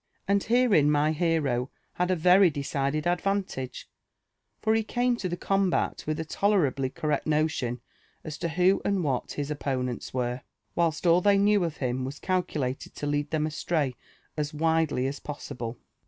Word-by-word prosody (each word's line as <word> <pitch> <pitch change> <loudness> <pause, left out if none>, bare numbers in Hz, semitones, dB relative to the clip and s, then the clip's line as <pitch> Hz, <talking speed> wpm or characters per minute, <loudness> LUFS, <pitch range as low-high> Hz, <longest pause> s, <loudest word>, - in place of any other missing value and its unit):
And 200 0 +3
'herein 230 - +4
my 150 +1 +3
hero 150 -6 0 0.2
had 180 +1 0
a 185 - +3
very 180 +3 +6
decided 140 +1 -2
advantage; 180 -7 -2 0.7
for 220 - +2
he 225 - +3
came 245 +2 0
to 190 -5 -3
the 175 - -3
combat 195 0 0
with 155 0 -1
a 160 - -3
tolerably 155 -9 +1
correct 150 +3 -2
notion 150 -6 0 0.4
as 150 -1 -7
to 170 - -1
who 180 +4 +3
and 200 -3 0
what 135 -5 -1
his 145 0 -3
opponents 130 -4 -3
were, 125 0 -2 0.3
whilst 165 0 0
all 170 +1 +5
they 200 +1 +4
knew 205 -1 +4
of 165 -3 -3
him 130 -1 -1
was 135 +3 -5
calculated 150 -9 -2
to - - -5
lead 145 0 -1
Ihem 155 -1 0
astray 155 -3 -1 0.4
as 150 0 -3
widely 160 -4 +1
as 135 +1 -3
possible. 125 -5 -6
155 Hz, 165 wpm, -27 LUFS, 140-180 Hz, 0.7 s, very